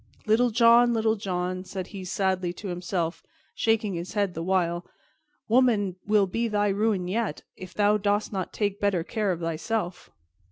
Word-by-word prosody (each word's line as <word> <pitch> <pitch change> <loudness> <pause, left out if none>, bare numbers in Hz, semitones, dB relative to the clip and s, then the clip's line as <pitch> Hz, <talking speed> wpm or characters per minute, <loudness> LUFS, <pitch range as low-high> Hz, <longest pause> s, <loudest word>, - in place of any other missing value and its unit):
"Little 235 +3 +3
John! 235 +1 +5
Little 220 0 +2
John!" 185 -2 -3
said 190 -1 -5
he 195 -2 -7
sadly 185 -1 -1
to 195 +2 -7
himself, 175 -1 -2 0.3
shaking 225 -3 +1
his 170 +1 -5
head 200 -4 0
the 165 - -5
while, 175 -1 0 0.6
"woman 220 -6 +3
will 210 -1 +4
be 230 +5 -1
thy 205 -1 +1
ruin 200 -2 0
yet, 220 +4 -2
if 185 -1 -10
thou 210 0 +3
dost 205 +1 0
not 190 -2 -3
take 205 -2 -2
better 195 -5 +1
care 210 +2 -1
of 175 -1 -3
thyself." 175 +3 -3
200 Hz, 165 wpm, -26 LUFS, 180-220 Hz, 0.6 s, John